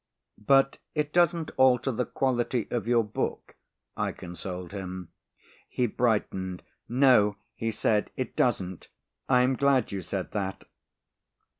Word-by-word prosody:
"But 135 Hz, 0 st, +4 dB, 0.2 s
it 150 Hz, -1 st, -1 dB
doesn't 170 Hz, -2 st, +2 dB
alter 130 Hz, 0 st, +4 dB
the 125 Hz, +1 st, -2 dB
quality 125 Hz, -3 st, 0 dB
of 115 Hz, -2 st, -2 dB
your 120 Hz, -1 st, +4 dB
book," 105 Hz, -, -4 dB, 0.4 s
I -, -, -1 dB
consoled 90 Hz, 0 st, -7 dB
him. 95 Hz, -3 st, -6 dB, 0.6 s
He 125 Hz, -, 0 dB
brightened, 105 Hz, -6 st, -1 dB, 0.3 s
"No," 125 Hz, -5 st, +5 dB, 0.2 s
he 115 Hz, -, -3 dB
said, 105 Hz, -1 st, +1 dB
"it 130 Hz, -, -4 dB
doesn't; 95 Hz, -8 st, 0 dB, 0.4 s
I 125 Hz, -1 st, +5 dB
am 130 Hz, +1 st, +2 dB
glad 135 Hz, -3 st, +2 dB
you 100 Hz, -1 st, -3 dB
said -, -, -4 dB
that." 95 Hz, -2 st, -3 dB
120 Hz, 130 wpm, -28 LUFS, 95-130 Hz, 0.6 s, No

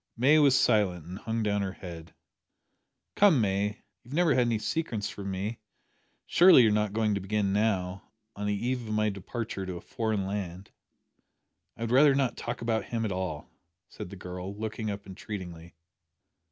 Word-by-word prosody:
May 140 Hz, +6 st, +5 dB
was 140 Hz, -3 st, +5 dB
silent, 90 Hz, -7 st, +2 dB
and 90 Hz, +3 st, -7 dB
hung 115 Hz, 0 st, -2 dB
down 105 Hz, -1 st, +1 dB
her 95 Hz, -1 st, -2 dB
head. 85 Hz, -3 st, -10 dB, 1.0 s
"Come, 195 Hz, -9 st, +5 dB
May, 105 Hz, 0 st, 0 dB, 0.2 s
you've 125 Hz, +4 st, -8 dB
never 175 Hz, -3 st, +4 dB
had 125 Hz, -1 st, +3 dB
any 115 Hz, -1 st, +1 dB
secrets 110 Hz, -2 st, -2 dB
from 100 Hz, -1 st, -6 dB
me. 100 Hz, +4 st, -3 dB, 0.7 s
Surely 175 Hz, -7 st, +7 dB
you're 110 Hz, -, +4 dB
not 105 Hz, -1 st, +1 dB
going 110 Hz, 0 st, +1 dB
to 100 Hz, -, -1 dB
begin 100 Hz, 0 st, -1 dB
now 95 Hz, -3 st, -1 dB, 0.3 s
on 105 Hz, 0 st, -3 dB
the 105 Hz, +3 st, -1 dB
eve 125 Hz, -3 st, -2 dB
of 110 Hz, -, -2 dB
my 110 Hz, 0 st, +2 dB
departure 100 Hz, +1 st, -5 dB
to 90 Hz, -1 st, -4 dB
a -, -, -9 dB
foreign 110 Hz, -2 st, -2 dB
land?" 95 Hz, -1 st, -5 dB, 1.1 s
"I -, -, -12 dB
would 115 Hz, 0 st, -2 dB
rather 140 Hz, +2 st, +6 dB
not 135 Hz, -3 st, +1 dB
talk 120 Hz, 0 st, -5 dB
about 115 Hz, -1 st, 0 dB
him 115 Hz, -1 st, -2 dB
at 105 Hz, -, -2 dB
all," 90 Hz, -5 st, -4 dB, 0.4 s
said -, -, -8 dB
the 100 Hz, -, -9 dB
girl, 90 Hz, +1 st, -7 dB
looking 110 Hz, +1 st, -4 dB
up 100 Hz, 0 st, -5 dB
entreatingly. 90 Hz, -4 st, -8 dB
105 Hz, 180 wpm, -29 LUFS, 95-115 Hz, 1.1 s, Surely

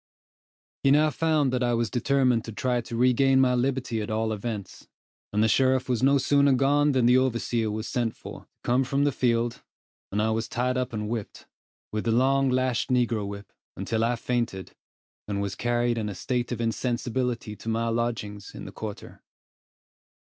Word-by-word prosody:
He 135 Hz, -, +3 dB
now 150 Hz, +2 st, +4 dB
found 155 Hz, -4 st, +1 dB
that 125 Hz, -, 0 dB
I 120 Hz, -1 st, +2 dB
was 115 Hz, -1 st, -1 dB
determined 125 Hz, -2 st, +2 dB
to 115 Hz, -, -6 dB
try 125 Hz, +2 st, -1 dB
to 115 Hz, -, -7 dB
regain 130 Hz, +2 st, +4 dB
my 130 Hz, -1 st, +4 dB
liberty 125 Hz, -2 st, -1 dB
at 105 Hz, -, -5 dB
all 110 Hz, 0 st, 0 dB
events, 105 Hz, -2 st, -6 dB, 0.4 s
and 105 Hz, +1 st, +2 dB
the -, -, +4 dB
sheriff 130 Hz, +3 st, +2 dB
was 125 Hz, -3 st, 0 dB
no 140 Hz, +2 st, +5 dB
sooner 140 Hz, +1 st, +3 dB
gone 145 Hz, +2 st, +3 dB
than 130 Hz, -2 st, +2 dB
the 125 Hz, +2 st, +6 dB
overseer 115 Hz, -3 st, 0 dB
was 110 Hz, +1 st, -4 dB
sent 120 Hz, -3 st, -1 dB
for, -, -, -9 dB
to -, -, -22 dB, 0.2 s
come 125 Hz, +2 st, +2 dB
from 135 Hz, +2 st, 0 dB
the 145 Hz, -, +3 dB
field, 120 Hz, -2 st, 0 dB, 0.5 s
and 100 Hz, -, -1 dB
I 110 Hz, +1 st, +2 dB
was 110 Hz, +1 st, -1 dB
tied 125 Hz, +1 st, -1 dB
up 125 Hz, 0 st, -1 dB
and 105 Hz, -2 st, -3 dB
whipped, 110 Hz, -2 st, -5 dB, 0.5 s
with 105 Hz, 0 st, -3 dB
the 115 Hz, -, +2 dB
long 135 Hz, +3 st, +3 dB
lashed 130 Hz, -1 st, 0 dB
negro 120 Hz, -5 st, +1 dB
whip, 100 Hz, 0 st, -9 dB, 0.2 s
until 110 Hz, -1 st, -1 dB
I 120 Hz, +1 st, +1 dB
fainted, 115 Hz, -5 st, -3 dB, 0.6 s
and 100 Hz, -1 st, -2 dB
was 100 Hz, -1 st, -2 dB
carried 120 Hz, +1 st, 0 dB
in 105 Hz, -1 st, -2 dB
a 100 Hz, -, -6 dB
state 125 Hz, +6 st, -2 dB
of 120 Hz, -, -3 dB
insensibility 120 Hz, -1 st, -2 dB
to 115 Hz, -, -6 dB
my 115 Hz, +1 st, 0 dB
lodgings 115 Hz, -3 st, -3 dB
in -, -, -8 dB
the -, -, -8 dB
quarter. 105 Hz, -2 st, -8 dB
120 Hz, 190 wpm, -26 LUFS, 110-130 Hz, 0.6 s, the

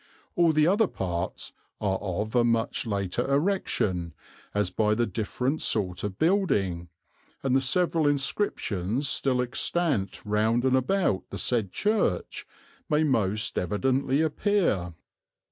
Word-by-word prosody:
All 170 Hz, -2 st, +4 dB
the 155 Hz, -1 st, +3 dB
other 205 Hz, +5 st, +3 dB
parts 90 Hz, -, -4 dB, 0.3 s
are 95 Hz, -2 st, 0 dB
of 105 Hz, +2 st, -3 dB
a 120 Hz, -1 st, +4 dB
much 115 Hz, 0 st, 0 dB
later 100 Hz, +5 st, -1 dB
erection, 125 Hz, -, 0 dB, 0.4 s
as 105 Hz, -3 st, 0 dB
by 105 Hz, +2 st, +2 dB
the 120 Hz, +2 st, +1 dB
different 125 Hz, +7 st, -2 dB
sort 90 Hz, -5 st, 0 dB
of 100 Hz, -2 st, -4 dB
building, 100 Hz, -, +1 dB, 0.5 s
and 135 Hz, -1 st, +2 dB
the 135 Hz, -, +4 dB
several 165 Hz, +3 st, +1 dB
inscriptions 135 Hz, -, -1 dB
still 130 Hz, -2 st, +1 dB
extant 130 Hz, -, -1 dB
round 110 Hz, +4 st, +1 dB
and 130 Hz, 0 st, +3 dB
about 130 Hz, -, +1 dB
the 100 Hz, -, -6 dB
said 105 Hz, -1 st, 0 dB
Church 210 Hz, -, -1 dB, 0.4 s
may 150 Hz, 0 st, +3 dB
most 110 Hz, -6 st, 0 dB
evidently 130 Hz, -, +1 dB
appear.... 160 Hz, -, 0 dB
120 Hz, 130 wpm, -27 LUFS, 100-150 Hz, 0.5 s, All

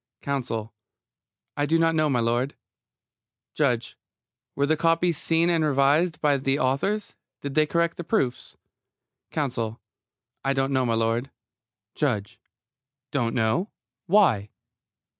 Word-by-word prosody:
COUNSEL: 120 Hz, -6 st, -3 dB, 0.8 s
I 145 Hz, 0 st, 0 dB
do 165 Hz, +3 st, +3 dB
not 165 Hz, 0 st, +3 dB
know, 155 Hz, -1 st, +2 dB
m'lud. 120 Hz, +1 st, +1 dB, 1.0 s
JUDGE: 125 Hz, -6 st, 0 dB, 0.6 s
Were 140 Hz, -, +2 dB
the 155 Hz, +2 st, +2 dB
copies 165 Hz, +1 st, +1 dB
seen 165 Hz, +1 st, +2 dB
and 165 Hz, -2 st, +2 dB
revised 150 Hz, +4 st, +2 dB
by 145 Hz, -2 st, +3 dB
the 135 Hz, +1 st, 0 dB
authors? 155 Hz, +11 st, 0 dB, 0.3 s
Did 140 Hz, -1 st, -5 dB
they 155 Hz, +1 st, +3 dB
correct 170 Hz, +1 st, 0 dB
the 175 Hz, -, -4 dB
proofs? 150 Hz, -, -1 dB, 0.7 s
COUNSEL: 120 Hz, -7 st, -2 dB, 0.6 s
I 135 Hz, -, +1 dB
don't 135 Hz, 0 st, 0 dB
know, 130 Hz, -2 st, +2 dB
m'lud. 115 Hz, +3 st, 0 dB, 0.6 s
JUDGE: 115 Hz, -5 st, -2 dB, 0.7 s
Don't 120 Hz, -5 st, 0 dB
know? 120 Hz, -, +1 dB, 0.4 s
Why? 165 Hz, -, +4 dB
140 Hz, 120 wpm, -25 LUFS, 120-165 Hz, 1.0 s, Why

